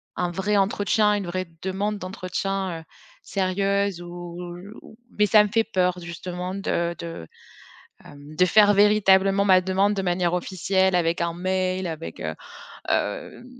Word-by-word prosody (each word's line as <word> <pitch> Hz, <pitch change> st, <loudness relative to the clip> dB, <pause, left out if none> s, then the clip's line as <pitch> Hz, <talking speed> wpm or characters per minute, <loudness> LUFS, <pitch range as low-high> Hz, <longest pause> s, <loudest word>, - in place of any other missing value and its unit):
un 180 Hz, -, -1 dB
vrai 200 Hz, +4 st, 0 dB
entretien, 210 Hz, +1 st, +2 dB
une 200 Hz, -, -3 dB
vraie 185 Hz, +1 st, -3 dB, 0.2 s
demande 200 Hz, +3 st, -2 dB
d'entretien, 185 Hz, -1 st, -3 dB
heu, -, -, -16 dB, 0.4 s
sérieuse 195 Hz, 0 st, 0 dB
ou 175 Hz, 0 st, -8 dB, 0.4 s
ou -, -, -15 dB, 0.2 s
mais 210 Hz, -, +4 dB
ça 210 Hz, 0 st, +6 dB
me 210 Hz, -, -2 dB
fait 225 Hz, +2 st, +2 dB
peur 180 Hz, -4 st, 0 dB
justement 180 Hz, +2 st, -6 dB
de 170 Hz, -3 st, -1 dB
de, 165 Hz, -, -7 dB, 0.8 s
hem, 145 Hz, +1 st, -13 dB
de 180 Hz, -, +5 dB
faire 205 Hz, +2 st, +5 dB
véritablement 195 Hz, -1 st, +4 dB
ma 185 Hz, -1 st, +6 dB
demande 195 Hz, +2 st, +1 dB
de 195 Hz, -, -2 dB
manière 175 Hz, -1 st, 0 dB
officielle 190 Hz, +1 st, 0 dB
avec 170 Hz, -1 st, +1 dB
un 170 Hz, 0 st, -1 dB
mail, 185 Hz, +1 st, -1 dB
avec, 150 Hz, -, -7 dB
heu, 80 Hz, 0 st, -3 dB, 0.6 s
hem, -, -, -2 dB
185 Hz, 150 wpm, -24 LUFS, 175-200 Hz, 0.8 s, ça